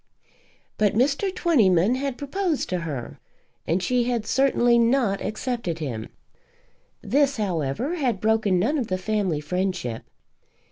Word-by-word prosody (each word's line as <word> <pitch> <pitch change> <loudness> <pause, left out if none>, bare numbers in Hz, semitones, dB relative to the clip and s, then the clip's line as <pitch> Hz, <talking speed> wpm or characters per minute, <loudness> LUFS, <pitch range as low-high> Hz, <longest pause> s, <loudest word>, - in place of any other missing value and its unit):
But 210 -2 +2
Mr. 280 - +1
Twentyman 225 - +3
had 265 0 -2
proposed 320 +2 -2
to 180 - -1
her, 145 -8 -6 0.5
and 175 +3 0
she 245 +1 +1
had 235 -3 -1
certainly 245 -3 +3
not 235 -4 +2
accepted 215 -6 -3
him. 125 -9 -5 0.9
This, 280 0 +2
however, 195 - -2
had 250 - 0
broken 215 -3 +2
none 270 - +1
of 240 - -2
the 185 - -1
family 190 -5 -1
friendship. 180 -7 -2
220 Hz, 130 wpm, -24 LUFS, 180-265 Hz, 0.9 s, Twentyman